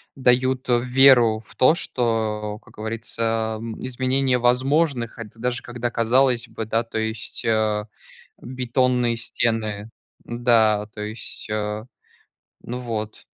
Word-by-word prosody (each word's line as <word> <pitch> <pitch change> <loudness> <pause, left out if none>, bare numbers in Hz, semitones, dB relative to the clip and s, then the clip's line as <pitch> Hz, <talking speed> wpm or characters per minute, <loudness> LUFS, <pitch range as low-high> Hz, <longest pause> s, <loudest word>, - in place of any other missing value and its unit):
дают 130 0 +2
веру 125 -2 +5
в 110 - -17
то, 130 +6 +5
что, 110 -6 -1
как - - -19
говорится, 110 0 -2
м, 115 -1 -6
изменение 130 0 +1
возможных, 130 0 +2
хот 115 -3 -7
даже 120 +2 -2
когда 120 0 -4
казалось 120 +1 +2
бы, 110 -1 -6
да, 115 +2 0
то 115 - -6
есть, 110 -1 -4
а 110 -2 +1 0.6
бетонные 125 -1 0
стены 110 -2 -2 0.3
Да, 115 -3 +2
то 105 - -8
есть, 105 +1 -7
а 105 +1 -3 0.8
Ну 125 +1 -5
вот. 110 -3 -5
115 Hz, 120 wpm, -23 LUFS, 110-125 Hz, 0.8 s, веру